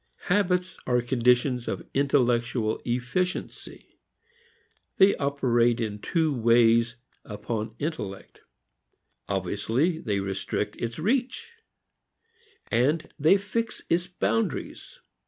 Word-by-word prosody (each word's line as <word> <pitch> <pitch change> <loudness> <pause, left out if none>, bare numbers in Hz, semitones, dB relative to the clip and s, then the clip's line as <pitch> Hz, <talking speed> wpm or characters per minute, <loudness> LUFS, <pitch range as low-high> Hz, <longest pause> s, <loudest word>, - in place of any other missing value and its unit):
Habits 180 -2 +1
are 125 -1 +3
conditions 125 0 +2
of - - -4
intellectual 120 -5 +1
efficiency. 125 +10 -3 1.0
They 195 +1 +6
operate 120 -4 +1
in 105 -3 -3
two 160 +5 0
ways 115 -1 +4 0.3
upon 110 +1 -5
intellect. 115 -11 -5 0.9
Obviously, 110 - 0
they 105 -9 -1
restrict 95 -1 -3
its 115 0 -4
reach, 265 - -1 1.2
they 150 - +2
fix 225 +3 -3
its 170 +2 +2
boundaries. 115 - -3
125 Hz, 85 wpm, -26 LUFS, 115-165 Hz, 1.2 s, They